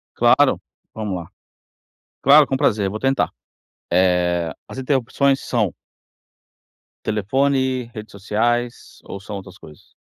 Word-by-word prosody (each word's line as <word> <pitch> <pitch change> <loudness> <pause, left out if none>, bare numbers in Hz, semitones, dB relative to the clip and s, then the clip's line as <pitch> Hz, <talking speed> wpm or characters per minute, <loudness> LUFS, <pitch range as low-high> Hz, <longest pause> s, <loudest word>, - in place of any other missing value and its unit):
Claro. - - +4 0.3
Vamos 105 -4 -3
lá. - - -18 0.9
Claro, 145 +1 +7
com 135 - -1
prazer, 100 -5 +1
vou 110 - -5
tentar. 135 +2 +1 0.6
Eh, 90 -2 +2 0.2
as - - -10
interrupções 135 +1 +1
são 110 -7 -1 1.3
telefone, 130 +3 0
redes 110 0 -9
sociais 120 +4 -2
ou 100 - -8
são 100 +1 -7
outras 95 -1 -10
coisas? 75 -2 -16
110 Hz, 115 wpm, -21 LUFS, 95-130 Hz, 1.3 s, Claro